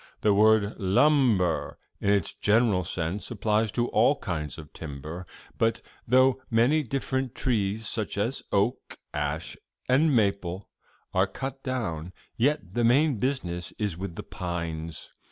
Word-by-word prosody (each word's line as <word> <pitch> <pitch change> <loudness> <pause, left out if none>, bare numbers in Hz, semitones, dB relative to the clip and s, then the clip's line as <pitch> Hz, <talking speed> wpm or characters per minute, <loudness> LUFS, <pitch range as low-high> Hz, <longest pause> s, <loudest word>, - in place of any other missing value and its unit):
The 105 - +4
word 110 0 +4
"lumber," 100 - +3 0.2
in 100 - 0
its 100 -1 +2
general 105 -3 +3
sense, 90 +3 -3
applies 110 0 +1
to 120 0 +1
all 120 +7 +4
kinds 80 - -4
of 75 -2 -11
timber. 80 +4 -7 0.3
But 115 0 +1 0.2
though 130 +2 +4
many 125 +7 +3
different 130 -1 -2
trees, 110 -3 0
such - - -1
as - - -1
oak, - - 0 0.2
ash 75 +2 -2 0.3
and 140 +3 +4
maple, 100 -3 0 0.5
are 95 +1 +3
cut 135 +6 -6
down, 95 - -3 0.2
yet 125 -7 0
the 120 - +1
main 135 +3 +4
business 95 -8 -2
is 105 -6 -1
with 90 -1 -6
the - - -6
pines. 85 -2 -5
105 Hz, 135 wpm, -27 LUFS, 90-125 Hz, 0.5 s, The